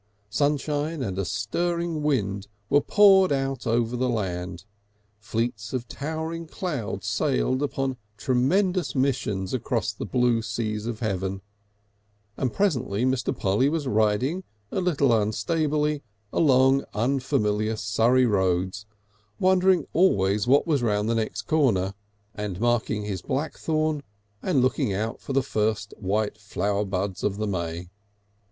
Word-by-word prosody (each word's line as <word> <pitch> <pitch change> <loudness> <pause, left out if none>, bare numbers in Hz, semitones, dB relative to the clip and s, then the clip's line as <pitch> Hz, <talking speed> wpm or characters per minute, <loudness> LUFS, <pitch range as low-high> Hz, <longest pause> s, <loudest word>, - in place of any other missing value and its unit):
Sunshine 145 +3 0
and 95 -4 -3
a 100 - 0
stirring 165 - -1
wind 100 -9 0 0.2
were 145 - +5
poured 195 -2 +6
out 135 -2 -1
over 115 +1 +1
the 125 +1 0
land, 90 -5 -3 0.5
fleets 110 0 -3
of 125 -2 -3
towering 160 +4 -4
clouds 155 - -4
sailed 60 - +1
upon 135 -2 -1
urgent 125 - -11 0.2
tremendous 175 - +1
missions 120 -8 0
across 120 -4 -1
the - - -6
blue 125 -2 +2
seas 110 0 -3
of 115 -1 -4
heaven, 95 -3 -2 0.9
and 130 -3 -1
presently 130 - 0
Mr. 130 0 +1
Polly 105 +8 +2
was 155 -1 -1
riding 125 - +1 0.3
a 190 - -1
little 150 -7 +2
unstably 150 - +1 0.3
along 135 -2 +4
unfamiliar 110 -3 +1
Surrey 115 +5 +3
roads, 95 -1 0 0.5
wondering 185 -1 +4
always 105 - +3
what 140 +3 +5
was 150 -6 +1
round 105 -2 +1
the - - +2
next 110 -1 -2
corner, 110 - +2 0.4
and 105 -4 -4
marking 115 -2 +1
the 100 -4 -4
blackthorn 155 +1 -1 0.4
and 145 -9 +2
looking 130 -2 +1
out 110 +4 -3
for 135 - -5
the 135 0 +3
first 110 -2 -1
white 105 +1 -1
flower 100 0 -1
buds 95 -1 -3
of 100 -1 0
the 110 - -1
may. 85 -2 -3
120 Hz, 135 wpm, -25 LUFS, 105-145 Hz, 0.9 s, poured